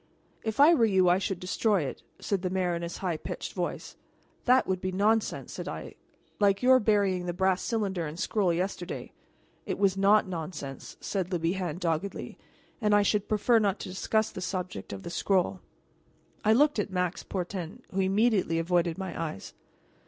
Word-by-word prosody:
"If 220 +1 -4
I 300 +4 +8
were 280 - +3
you 190 -4 +4
I 180 +2 +4
should 190 -2 -2
destroy 195 0 +1
it," 135 - -5 0.2
said 200 -3 -1
the 185 - -1
mayor 180 -1 0
in 170 - -3
his 170 0 -5
high 170 -3 0
pitched - - -6
voice. - - -4 0.5
"That 255 +1 +5
would 185 -1 -1
be 185 - -2
nonsense," 210 +4 +1
said - - -6
I, - - -6 0.5
"like 200 +1 +3
your 255 +1 +7
burying 200 -5 +1
the 175 - -2
brass 190 0 +2
cylinder 195 -7 -1
and 155 +3 -8
scroll 195 -3 +1
yesterday." 175 +1 -3 0.6
"It - - -2
was 195 -1 +2
not 200 +2 +4
nonsense," 160 -6 -6
said 190 -2 -2
Le 180 - +1
Bihan 170 0 -1
doggedly, 175 +2 -3 0.4
"and 210 -1 +3
I 205 - +5
should 205 0 0
prefer 220 +2 +3
not 205 -2 +1
to - - -6
discuss 215 +4 0
the 185 - -7
subject 180 - -4
of 95 -1 -7
the - - -6
scroll." 185 +1 +1 0.8
I 215 - +5
looked 290 0 +4
at 205 - -1
Max 180 -2 -1
Portin, 180 -2 -5
who 195 - -2
immediately 195 -3 +2
avoided 170 0 +1
my 190 -3 -4
eyes. 155 -11 -7
190 Hz, 180 wpm, -28 LUFS, 175-205 Hz, 0.8 s, I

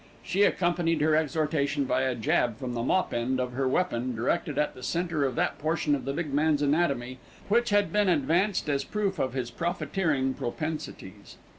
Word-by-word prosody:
She 185 +2 0
accompanied 175 -4 +2
her 155 +1 +3
exhortation 150 -2 0
by 130 0 +1
a 130 -1 0
jab 115 0 +1
from 130 -2 -5
the 120 - -2
mop 185 +10 +1
end 125 +2 0
of 125 0 -1
her 130 +2 -1
weapon 130 -5 0
directed 140 +6 -1
at 150 0 +1
the 125 - -12
centre 165 0 -1
of 130 -2 -2
that - - 0
portion 155 -1 0
of 140 - -1
the 135 - -2
big 150 -2 -3
man's 150 0 +2
anatomy 140 -5 0 0.3
which 235 +3 +3
had 205 0 +2
been 205 -2 +3
advanced 175 +6 +1
as 140 -2 0
proof 200 -2 -2
of 130 -2 -1
his 125 -3 -3
profiteering 160 -3 -1
propensities. 120 - -6
150 Hz, 185 wpm, -28 LUFS, 130-170 Hz, 0.3 s, her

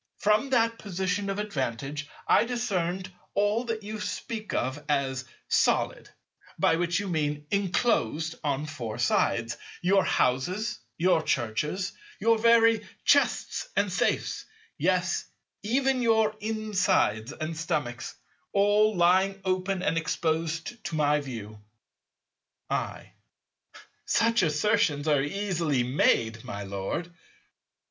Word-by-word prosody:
From 215 +6 +2
that 230 -3 +2
position 190 0 -2
of 195 - -2
advantage 145 - -3 0.2
I - - +5
discerned 190 -7 -2 0.2
all 205 +4 +2
that 225 -2 -3
you 215 +1 -5
speak 215 +1 -4
of 130 +4 -2
as 135 -3 0 0.2
solid - - +1 0.5
(by 165 - +3
which 175 +1 +1
you 205 - -4
mean 150 -4 -1
"enclosed 180 - +1
on 145 0 -1
four 125 -8 -5
sides"), 120 -1 +1 0.2
your 190 +2 +3
houses, 175 - 0 0.2
your 175 -1 +3
churches, 150 - -1 0.3
your 230 0 +3
very 230 -1 +5 0.2
chests 285 +11 +2
and - - +1
safes, - - 0 0.3
yes - - +1 0.4
even 260 +4 +1
your 220 -2 +3
insides 205 - +1
and 155 +1 -5
stomachs, 150 -7 -3 0.4
all 205 +1 +4
lying 190 +3 +3
open 185 0 0
and 165 0 +1
exposed 165 +6 -2
to 170 - -3
my 150 -1 +3
view. 110 -6 -8 1.1
I. - - -3 1.0
Such 230 -1 +3
assertions 160 -2 +1
are 145 -3 +4
easily 165 -4 0
made, 115 -3 +2
my 105 -5 -6
Lord. 100 - -4
175 Hz, 115 wpm, -27 LUFS, 145-210 Hz, 1.1 s, I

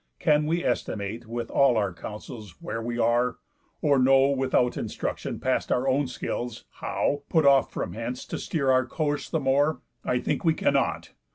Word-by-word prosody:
Can 150 -2 +2
we 170 +2 0
estimate, 110 +3 -2
With 115 0 -4
all 135 -4 +4
our 100 -4 0
counsels, 105 0 -9
where 115 - -4
we 120 +1 -3
are? 120 +1 +2 0.5
Or 140 -3 +4
know 135 +1 +5
(Without 130 -2 +1
instruction, - - -4
past - - 0
our 125 +2 +1
own 135 +1 +2
skills) 120 -2 -4
how, 145 0 -1
Put 160 -3 +3
off 140 -1 +5
from - - -4
hence, 115 +3 -5
to - - -5
steer 140 -5 0
our 130 -1 +3
course 145 +2 -2
the 160 - 0
more? 145 +3 +2 0.2
I 125 - +1
think - - -1
we 160 -2 +3
cannot. 85 - 0
130 Hz, 175 wpm, -26 LUFS, 115-140 Hz, 0.5 s, know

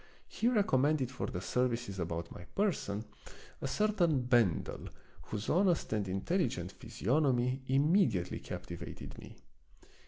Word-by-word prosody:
He 230 - -1
recommended 150 - +3
for 130 - -3
the 90 - -4
services 120 -3 -1
about 85 -1 -3
my 90 - -9
person 115 - 0 0.6
a - - -1
certain 175 -4 +2
Ben 120 -8 +3
del, - - -7 0.4
whose 105 0 -4
honest 175 - +2
and 105 -2 0
intelligent 95 - -1
physiognomy 130 +1 +1
immediately 135 - +2
captivated 85 -1 -7
me. - - -11
125 Hz, 120 wpm, -33 LUFS, 100-160 Hz, 0.6 s, recommended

